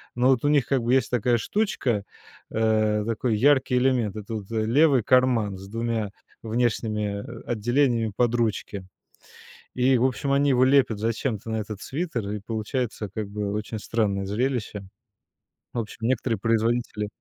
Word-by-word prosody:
Но 125 +2 +3
вот 130 +1 +2
у - - +4
них 145 -3 +3
как 135 -3 +1
бы 120 +2 +1
есть 135 - +2
такая 120 0 +2
штучка, 125 - -1 0.5
э, 110 -1 +2
такой 115 0 0
яркий 130 +1 +3
элемент, 125 -6 +1
это 105 +1 -6
вот 100 -1 -6
левый 120 +4 +3
карман 120 -6 +3
с 95 +1 -10
2 115 -1 -2 0.3
внешними 110 -3 -1 0.2
отделениями 120 -1 +1
под 120 -1 +2
ручки, 105 -4 -2 0.9
и, 130 +1 +3
в 120 - +2
общем, 130 +2 -1
они 140 +1 +3
его 130 0 +4
лепят 130 -5 +4
зачем-то 115 -1 -2
на 110 - -1
этот 105 -1 -5
свитер, 130 - -3
и 105 0 -3
получается 110 0 -3
как 110 -2 -3
бы 100 0 -3
очень 105 +1 -4
странное 100 -3 -1
зрелище. 105 -1 -2 0.9
В 120 - -2
общем, 110 0 -6
некоторые 115 -1 0
производители 115 0 0
115 Hz, 155 wpm, -25 LUFS, 105-125 Hz, 0.9 s, у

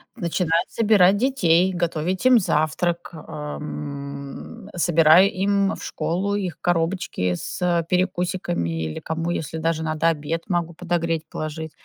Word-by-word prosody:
начинаю 170 -4 0
собирать 205 -4 +4
детей, 190 -8 +3
готовить 175 +3 -2
им 255 -2 +7
завтрак, 170 0 0
ам, 140 - -7
собираю 170 +2 +5
им 200 +1 +1
в - - -10
школу 195 +4 -2
их 185 -6 -3
коробочки 165 - 0
с 170 - -1
перекусиками 180 - 0
или 80 -1 -4
кому, 165 +1 -3
если 160 -2 -3
даже 160 0 -1
надо 155 +1 0
обед, 160 +1 -2
могу 170 -2 -1
подогреть, 165 -2 -2
положить. 155 0 -5
170 Hz, 120 wpm, -23 LUFS, 155-180 Hz, -, им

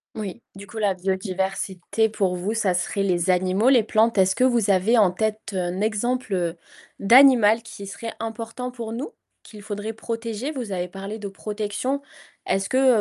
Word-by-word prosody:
Oui, 215 +1 -6
du 195 +1 -10
coup 220 +2 -8
la 200 -3 +1
biodiversité 190 +2 -1
pour 195 -4 0
vous, 190 +5 -2
ça 200 -5 +1
serait 185 +2 -1
les 180 -2 0
animaux, 185 +5 +3
les 250 -4 +5
plantes. 220 +1 +2
Est-ce 190 0 +4
que - - +1
vous 235 -5 +3
avez 195 +6 +3
en 200 -5 +5
tête 215 +3 -1
un 180 0 -2
exemple, 220 +2 -1
heu, 175 -2 -1 0.4
d'animal 230 -1 +6
qui 210 -3 -10
serait 225 +4 -6
important 230 +2 -5
pour 235 -3 -6
nous? 250 - -5 0.3
Qu'il 210 -2 -12
faudrait 210 +1 -5
protéger? 230 +3 -4
Vous 250 -8 -5
avez 180 -1 -2
parlé 195 +4 -7
de 205 - -5
protection, 210 +7 -3 0.5
est-ce 195 0 0
que, 260 -2 +4
210 Hz, 175 wpm, -23 LUFS, 190-230 Hz, 0.5 s, d'animal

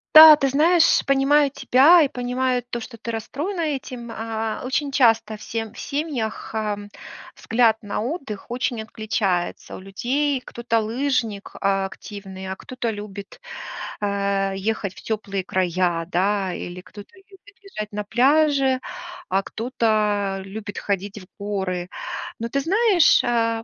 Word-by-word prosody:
Да, 310 0 +12
ты 275 -2 0
знаешь, 325 +4 +4
понимаю 275 +1 +4
тебя 290 +6 +6
и 285 - +3
понимаю 250 -1 -1
то, 240 -1 -3
что 230 +1 -9
ты 230 +1 -5
расстроена 300 - -4
этим. 260 -6 -4
А 225 -1 -3
очень 275 +2 -1
часто 225 -5 +3
в - - -18
сем 225 -1 -4
в - - -11
семьях, 280 -8 -3
эм, 210 -2 -3 0.4
взгляд 225 -1 +2
на 205 0 -3
отдых 240 - -5
очень 245 -2 -1
отличается 210 -5 -2
у - - -9
людей. 255 +9 -1
Кто-то 235 -1 -1
лыжник, 230 -3 -1
а, 195 -1 +2
активный, 190 -1 -8
а 190 - -5
кто-то 255 -3 -4
любит, 205 -2 -7 0.6
э, 200 -1 0
ехать 200 -1 -2
в - - -12
тёплые 200 -4 -3
края, 180 -2 0
да. 190 +1 +1
Или 175 +1 -6
кто-то 205 - -13
любит 390 0 -19 0.2
лежать 215 - -7
на 210 - -2
пляже, 265 +3 +3 0.5
а 195 +1 +1
кто-то 210 -4 0
любит 205 +1 -7
ходить 200 +1 -3
в 185 - -14
горы. 190 -3 -2 0.5
Но, 230 +1 -3
ты 275 - 0
знаешь, 385 - +4
а 230 -1 +1
225 Hz, 140 wpm, -23 LUFS, 200-270 Hz, 0.6 s, Да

